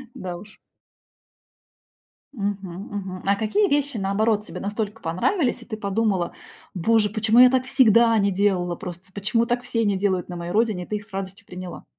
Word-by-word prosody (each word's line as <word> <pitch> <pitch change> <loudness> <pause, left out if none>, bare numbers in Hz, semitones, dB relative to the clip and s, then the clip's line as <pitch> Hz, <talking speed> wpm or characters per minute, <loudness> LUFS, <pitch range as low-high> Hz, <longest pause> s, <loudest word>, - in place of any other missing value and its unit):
Да 180 -2 -5
уж. 210 +3 -14 1.8
Мгм, 200 -4 -3 0.3
мгм. 185 -2 -5
А 200 +1 +3
какие 225 - +1
вещи, 285 -5 0
наоборот, 210 +2 +1
тебе - - -7
настолько 210 +2 -4
понравились, 240 - 0
и - - -17
ты 220 -3 -6
подумала: 200 -3 0 0.4
"Боже, 210 +3 +2
почему 220 +2 +3
я 250 0 +9
так 260 0 +1
всегда 235 -3 +5
не 200 0 +2
делала 185 -3 +1
просто? 180 +2 -9
Почему 230 +4 +1
так 245 0 -1
все 230 -2 -1
не 200 -2 +1
делают 185 -2 0
на 175 - -5
моей 170 0 -5
родине?" 215 -4 +1
И - - -12
ты 210 - -2
их 205 - -10
с 220 - -19
радостью 195 +2 -6
приняла? 180 -1 -8
205 Hz, 180 wpm, -23 LUFS, 190-230 Hz, 1.8 s, я